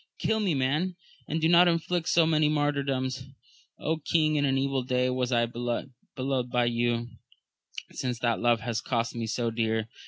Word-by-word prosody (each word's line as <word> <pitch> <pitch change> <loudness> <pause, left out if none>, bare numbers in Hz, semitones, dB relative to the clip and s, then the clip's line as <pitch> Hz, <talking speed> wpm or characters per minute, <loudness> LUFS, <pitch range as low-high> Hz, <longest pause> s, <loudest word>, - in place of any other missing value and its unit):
Kill 220 - 0
me 190 -7 +1
man, 150 +8 0 0.3
and 160 - -1
do 160 - +3
not 175 +1 +6
inflict 170 0 0
so 170 -1 +4
many 155 -1 +3
martyrdoms! 135 -3 -1 0.8
king, 155 -2 +3
in 145 -1 +2
an 135 -1 +1
evil 135 0 0
day 125 0 0
was 125 0 -1
I 120 -1 +3
beloved 120 +2 -4 0.6
by 120 0 +2
you, 120 0 0 0.8
since 125 -2 -3
that 115 0 0
love 120 -1 +2
has 115 -1 -2
cost 115 -1 -1
me 115 -1 -4
so 115 +1 -1
dear 110 -1 -1
130 Hz, 165 wpm, -28 LUFS, 120-155 Hz, 0.8 s, not